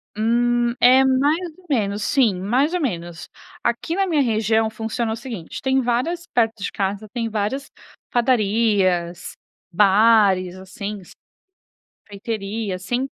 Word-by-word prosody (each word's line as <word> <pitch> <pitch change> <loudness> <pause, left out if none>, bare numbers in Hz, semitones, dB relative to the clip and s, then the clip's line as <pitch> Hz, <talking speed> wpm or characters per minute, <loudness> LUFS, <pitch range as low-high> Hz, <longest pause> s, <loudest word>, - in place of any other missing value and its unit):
Hum, 240 +2 +1
é 255 +2 +6
mais 270 +4 +2 0.2
ou 370 - -21
menos, 210 -7 -1
sim, 235 -10 +2
mais 250 - +1
ou - - 0
menos. 175 - -4 0.4
Aqui 240 +8 -1
na 390 - +1
minha 320 -6 +1
região 220 -2 +1
funciona 225 +1 -3
o - - -2
seguinte: 230 -8 -7
tem 265 0 +1
várias 285 +9 -1
perto 225 -3 0
de - - -3
casa, 200 +2 -3
tem 230 0 -3
várias 220 +6 -3 0.4
padarias, 205 -7 +1 0.4
bares, 195 -1 +4
assim, 200 +2 -7 1.1
sorveteria, 205 0 -4
assim 240 +9 -2
225 Hz, 125 wpm, -21 LUFS, 200-250 Hz, 1.1 s, é